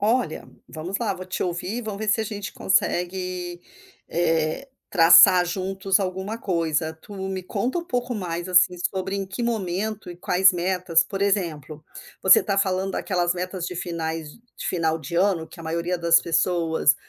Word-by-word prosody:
Olha, 215 -5 0 0.2
vamos 170 +5 -5
lá 210 -5 -1
vou 185 0 -8
te 185 - -3
ouvir 180 +6 -3
e - - -3
vamos 210 -2 -5
ver 215 - -3
se 215 - +3
a 220 - -1
gente 205 -1 -6
consegue, 180 -1 -1 0.5
eh, 165 - 0 0.2
traçar 180 +1 +7
juntos 190 +2 0
alguma 190 +3 -3
coisa. 160 -5 -1
Tu 205 - -13 0.2
me 190 -1 -4
conta 240 - -2
um 340 - -4
pouco 245 -4 -2
mais 175 -3 -4
assim, 180 0 +4
sobre 190 +1 -3
em 195 -1 -3
que 195 +6 -5
momento 215 -2 -2
e 175 - -9
quais 185 +2 +4
metas, 180 -2 +1
por 195 +3 -6
exemplo, 160 -7 -2 0.4
você 190 - +7
tá 195 - -1
falando 190 0 0
daquelas 175 -3 0
metas 180 0 -4
de 180 - -6
finais 165 -3 -4 0.3
de - - -6
final 160 -3 0
de 155 +2 -6
ano 175 -3 +1
que - - -14
a - - -9
maioria 170 +2 -2
das 170 0 +5
pessoas 165 -3 +2
180 Hz, 175 wpm, -24 LUFS, 170-195 Hz, 0.5 s, traçar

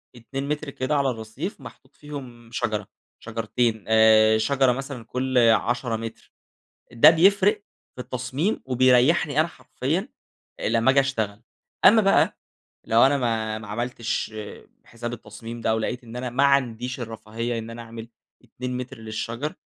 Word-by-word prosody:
2 135 +4 -6
متر 150 0 -2
كده 135 +2 -2
على 140 -2 +2
الرّصيف 120 - -6
محطوط - - -14
فيهم 130 -6 -10
شجرة 110 -4 -2 0.3
شجرتين 115 0 -2
آآ 110 0 +6
شجرة 135 +3 +2
مثلًا 135 -2 -5
كل 130 +1 -2
10 115 +1 +3
متر 115 0 -8 0.6
ده 120 +6 +8
بيفرِق 200 +5 +4 0.3
في 125 - -6
التصميم 130 - -2
وبيريّحني 130 +4 +3
أنا 160 - +4
حرفيًا 170 - -3 0.5
لما 115 +3 +2
اجي 135 - +4
اشتغل. 110 -6 -1 0.4
أما 220 +3 +8
بقى 195 -1 +3 0.5
لو 115 +1 +4
أنا 140 +1 +2
ما 110 -3 -1
ما 110 -1 -10
عملتش 115 0 -3 0.5
حساب 120 0 -7
التصميم 115 +1 -8
ده، 110 - 0
أو 110 - +2
لقيت 120 +3 -3
إن 115 +1 -10
أنا 125 0 -4
ما 135 +4 +2
عنديش 125 -2 +1
الرفاهية 115 +1 -4
إن 115 0 -7
أنا 115 0 -8
أعمل 115 0 -9 0.4
2 125 +2 -5
متر 125 0 -6
للشجر 115 +5 -4
120 Hz, 145 wpm, -24 LUFS, 115-135 Hz, 0.6 s, ده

